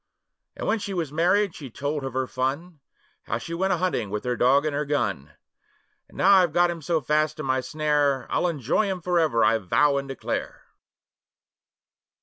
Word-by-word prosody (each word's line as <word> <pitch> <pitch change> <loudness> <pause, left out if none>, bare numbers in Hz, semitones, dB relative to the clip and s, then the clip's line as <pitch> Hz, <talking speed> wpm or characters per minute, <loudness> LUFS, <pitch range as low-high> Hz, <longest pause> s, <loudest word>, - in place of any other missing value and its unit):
And - - -5
when 225 - +1
she 200 -1 -5
was 165 -5 -2
married 180 +5 +2
she 140 -6 -9
told 145 +4 -3
of 135 - -5
her 130 0 0
fun, 145 +7 -3 0.5
How 115 - -2
she 140 +8 -7
went 190 +3 0
a - - 0
hunting 180 - -1
with 105 +1 -4
her 125 0 -1
dog 135 +5 +3
and 155 - -1 0.2
gun: 75 - -2 0.8
'And - - -17
now 195 - +4
I've 175 -5 +3
got 175 0 +3
him 170 -1 -7
so 160 +1 0
fast 155 +2 0
in 155 - -4
my 130 0 +1
snare, 145 -3 0
I'll - - +1
enjoy 155 - 0
him 190 -2 -3
for 180 0 +1
ever, 150 -8 +2
I 115 - +3
vow 140 +9 +2
and 140 0 -3
declare! 135 - -4
150 Hz, 190 wpm, -25 LUFS, 130-175 Hz, 0.8 s, now